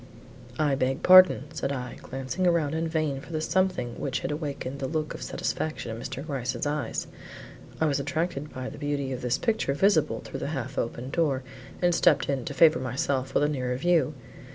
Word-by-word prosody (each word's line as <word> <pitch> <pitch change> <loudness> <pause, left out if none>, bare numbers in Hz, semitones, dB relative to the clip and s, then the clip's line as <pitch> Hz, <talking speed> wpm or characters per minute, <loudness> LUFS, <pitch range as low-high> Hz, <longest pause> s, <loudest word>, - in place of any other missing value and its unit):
"I 150 -3 +2
beg 135 0 0
pardon," 185 -6 +8
said 145 -3 -2
I, 125 -3 -5
glancing 135 +7 -2
around 165 -4 +2
in 165 +1 -1
vain 155 -4 -1
for 170 - -12
the 155 - -1
something 180 -7 0
which 135 - -2
had - - -2
awakened 140 -3 -4
that 135 - -2
look 155 +1 -2
of - - -8
satisfaction 155 -7 -3
in 115 - -8
Mr. 135 +3 -5
Gryce's 130 -4 -3
eyes. 145 -5 -2 0.7
"I 160 - +3
was 145 -2 +1
attracted 150 +1 -2
by 130 0 -5
the 150 - -8
beauty 145 -2 -2
of 130 - -5
this 125 +1 +1
picture 220 -12 0
visible 185 -2 +2
through - - -7
the - - -3
half - - -4
open 125 +3 -3
door 140 -6 +1 0.4
and 175 0 +4
stepped 155 -4 +3
in 135 -4 -1
to - - -4
favor 155 +2 +6
myself 130 0 -2
with - - +4
a - - +4
nearer 130 -4 -1
view. 155 -1 +2
145 Hz, 200 wpm, -27 LUFS, 130-160 Hz, 0.7 s, pardon